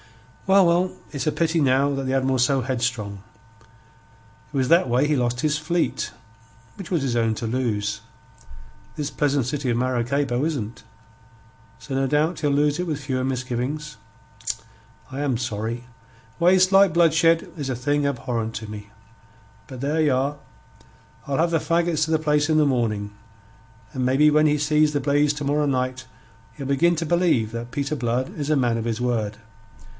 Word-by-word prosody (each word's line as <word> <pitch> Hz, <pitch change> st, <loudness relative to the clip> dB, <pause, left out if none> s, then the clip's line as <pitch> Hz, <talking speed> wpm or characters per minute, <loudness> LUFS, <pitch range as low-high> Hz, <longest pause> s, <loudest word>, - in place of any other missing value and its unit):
"Well, 195 Hz, 0 st, +6 dB
well, 175 Hz, +2 st, +2 dB, 0.2 s
it's 140 Hz, -2 st, -4 dB
a -, -, +3 dB
pity 165 Hz, 0 st, 0 dB
now 140 Hz, +1 st, +3 dB
that 135 Hz, -, -3 dB
the 130 Hz, -, -1 dB
Admiral's 130 Hz, -1 st, +2 dB
so 135 Hz, +1 st, +2 dB
headstrong. 120 Hz, -6 st, -3 dB, 1.3 s
It -, -, -4 dB
was 130 Hz, -1 st, +1 dB
that 165 Hz, -2 st, +4 dB
way 125 Hz, +5 st, +2 dB
he 150 Hz, -, +2 dB
lost 120 Hz, -1 st, 0 dB
his 150 Hz, -1 st, +1 dB
fleet, 165 Hz, +3 st, -1 dB, 0.6 s
which 195 Hz, -, -9 dB
was 165 Hz, -6 st, +1 dB
his 125 Hz, -3 st, -1 dB
own 115 Hz, -1 st, +1 dB
to 115 Hz, -, -4 dB
lose. 110 Hz, -4 st, -1 dB, 1.0 s
This 150 Hz, -1 st, -3 dB
pleasant 145 Hz, -3 st, +1 dB
city 135 Hz, +1 st, -2 dB
of 120 Hz, -, +1 dB
Maracaybo 130 Hz, +1 st, 0 dB
isn't. 130 Hz, -8 st, -3 dB, 1.0 s
So 135 Hz, -, -6 dB
no 135 Hz, 0 st, +1 dB
doubt 155 Hz, +4 st, +1 dB
he'll 150 Hz, -, +1 dB
lose 145 Hz, +2 st, +2 dB
it 180 Hz, -, -2 dB
with 150 Hz, -3 st, -2 dB
fewer 130 Hz, -2 st, -2 dB
misgivings. 130 Hz, +4 st, -3 dB, 1.1 s
I 135 Hz, +2 st, -5 dB
am 135 Hz, -5 st, 0 dB
sorry. 115 Hz, 0 st, -4 dB, 0.5 s
Waste, 185 Hz, +2 st, +4 dB
like 195 Hz, -3 st, +6 dB
bloodshed, 165 Hz, 0 st, +3 dB
is 145 Hz, -4 st, -4 dB
a 130 Hz, -, -1 dB
thing 145 Hz, +4 st, 0 dB
abhorrent 120 Hz, -4 st, -2 dB
to 110 Hz, -1 st, -6 dB
me. 105 Hz, -1 st, -8 dB, 0.8 s
But 130 Hz, -, -9 dB
there 150 Hz, +4 st, 0 dB
ye 155 Hz, -, +3 dB
are! 135 Hz, +2 st, 0 dB, 0.9 s
I'll 140 Hz, -1 st, -1 dB
have 170 Hz, +1 st, +2 dB
the 165 Hz, -, +2 dB
faggots 165 Hz, -1 st, +1 dB
to 160 Hz, -, -4 dB
the 160 Hz, -, +3 dB
place 150 Hz, -1 st, +1 dB
in 155 Hz, -, +3 dB
the 155 Hz, -, +4 dB
morning, 110 Hz, -6 st, 0 dB, 0.8 s
and 130 Hz, -, -2 dB
maybe 135 Hz, +4 st, +4 dB
when 155 Hz, +1 st, +4 dB
he 150 Hz, 0 st, +2 dB
sees 150 Hz, +1 st, +2 dB
the 145 Hz, -, 0 dB
blaze 145 Hz, +1 st, +2 dB
to 145 Hz, -1 st, -4 dB
morrow 145 Hz, +1 st, +1 dB
night 130 Hz, -1 st, -2 dB, 0.5 s
he'll 140 Hz, -, -6 dB
begin 160 Hz, +6 st, +2 dB
to 165 Hz, -, -1 dB
believe 160 Hz, -10 st, +2 dB
that 115 Hz, +1 st, -6 dB
Peter 140 Hz, +3 st, -2 dB
Blood 125 Hz, 0 st, -2 dB
is 145 Hz, -1 st, -3 dB
a 155 Hz, -, +3 dB
man 120 Hz, -3 st, +1 dB
of 115 Hz, -, -3 dB
his 115 Hz, -1 st, -2 dB
word. 110 Hz, -4 st, -1 dB
140 Hz, 180 wpm, -23 LUFS, 125-155 Hz, 1.3 s, Well